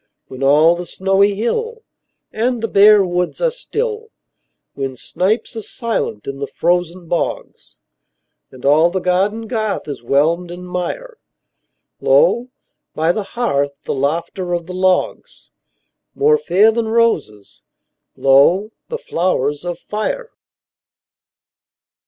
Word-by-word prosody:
When 130 Hz, 0 st, -9 dB
all 150 Hz, +5 st, +5 dB
the 175 Hz, 0 st, -6 dB
snowy 195 Hz, +2 st, +2 dB
hill 455 Hz, -, -2 dB, 0.5 s
And 235 Hz, +1 st, -1 dB
the -, -, +1 dB
bare 205 Hz, -1 st, +6 dB
woods 180 Hz, 0 st, -2 dB
are -, -, +1 dB
still; 455 Hz, -2 st, -4 dB, 0.6 s
When 135 Hz, -1 st, -4 dB
snipes 205 Hz, -, -1 dB
are 225 Hz, -, -4 dB
silent 220 Hz, -, -3 dB
in 135 Hz, 0 st, -6 dB
the 140 Hz, -, -3 dB
frozen 175 Hz, 0 st, -1 dB
bogs, 170 Hz, -, -4 dB, 0.7 s
And 130 Hz, 0 st, -12 dB
all 155 Hz, +4 st, +5 dB
the 190 Hz, +2 st, -2 dB
garden 195 Hz, +5 st, 0 dB
garth 215 Hz, -5 st, -2 dB
is 140 Hz, -4 st, -6 dB
whelmed 160 Hz, +8 st, +1 dB
in 175 Hz, +1 st, -8 dB
mire, 450 Hz, -, -5 dB, 0.8 s
Lo, -, -, +3 dB, 0.5 s
by 160 Hz, +2 st, +2 dB
the 215 Hz, -, -2 dB, 0.2 s
hearth, 145 Hz, -12 st, 0 dB
the -, -, -3 dB
laughter 170 Hz, +6 st, -2 dB
of 170 Hz, -1 st, -4 dB
the 180 Hz, -, -8 dB
logs— 185 Hz, 0 st, -1 dB, 0.6 s
More 455 Hz, +2 st, +3 dB
fair 215 Hz, -, +4 dB
than 225 Hz, 0 st, -2 dB
roses, 220 Hz, -, -1 dB, 0.5 s
lo, 155 Hz, +10 st, +4 dB, 0.2 s
the 470 Hz, -, -3 dB
flowers 155 Hz, -, -1 dB
of 175 Hz, -1 st, -4 dB
fire! 465 Hz, -, -4 dB
185 Hz, 125 wpm, -18 LUFS, 165-230 Hz, 0.8 s, bare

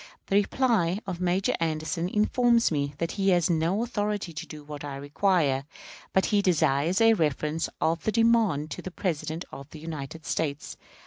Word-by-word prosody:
The 195 Hz, -, +2 dB
reply 205 Hz, -4 st, +2 dB
of 180 Hz, -2 st, -5 dB
Major 180 Hz, +2 st, +1 dB
Anderson 165 Hz, +1 st, -1 dB
informs 235 Hz, +2 st, +3 dB
me 140 Hz, -2 st, -1 dB
that 165 Hz, +2 st, -2 dB
he 195 Hz, -1 st, +1 dB
has 175 Hz, -2 st, +3 dB
no 170 Hz, +7 st, +1 dB
authority 210 Hz, -6 st, -2 dB
to -, -, -6 dB
do 150 Hz, -1 st, -9 dB
what 145 Hz, 0 st, -8 dB
I 145 Hz, -1 st, -5 dB
required, 145 Hz, -1 st, +1 dB, 0.5 s
but 190 Hz, -, +3 dB
he 205 Hz, -, +5 dB
desires 165 Hz, -2 st, +2 dB
a 225 Hz, 0 st, +6 dB
reference 155 Hz, -3 st, 0 dB
of 165 Hz, 0 st, 0 dB
the 220 Hz, -, +1 dB
demand 220 Hz, -10 st, +2 dB
to -, -, -5 dB
the -, -, -6 dB
President 160 Hz, -2 st, -3 dB
of 140 Hz, +1 st, -9 dB
the 155 Hz, -, -10 dB
United 160 Hz, 0 st, -7 dB
States. 150 Hz, -2 st, -2 dB
170 Hz, 175 wpm, -27 LUFS, 150-200 Hz, 0.5 s, a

